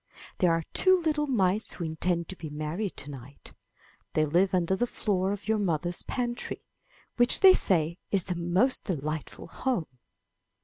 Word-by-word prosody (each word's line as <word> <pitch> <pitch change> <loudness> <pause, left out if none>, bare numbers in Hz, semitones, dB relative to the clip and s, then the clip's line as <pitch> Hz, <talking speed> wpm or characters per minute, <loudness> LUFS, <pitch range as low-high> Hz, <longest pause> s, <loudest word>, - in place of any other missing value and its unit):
There 180 -2 +4
are 165 0 +1
two 375 0 +5
little 305 -3 0
mice 210 -4 +1
who 175 - -6
intend 170 +1 -1
to 190 - -6
be 160 -4 -8
married 155 +7 -4
to 145 - -6
night. 135 +1 -12 0.6
They 155 - +2
live 175 +6 +2
under 180 0 +1
the 245 +5 0
floor 195 -4 0
of 205 0 -6
your 220 0 +2
mother's 175 -2 0
pantry, 245 -1 -4 0.5
which 240 0 +4
they 380 -2 +9
say 170 - +1
is 195 -3 +2
the 180 - -3
most 180 +10 +1
delightful 155 -4 -4
home.' 170 - -3
180 Hz, 165 wpm, -28 LUFS, 160-220 Hz, 0.6 s, they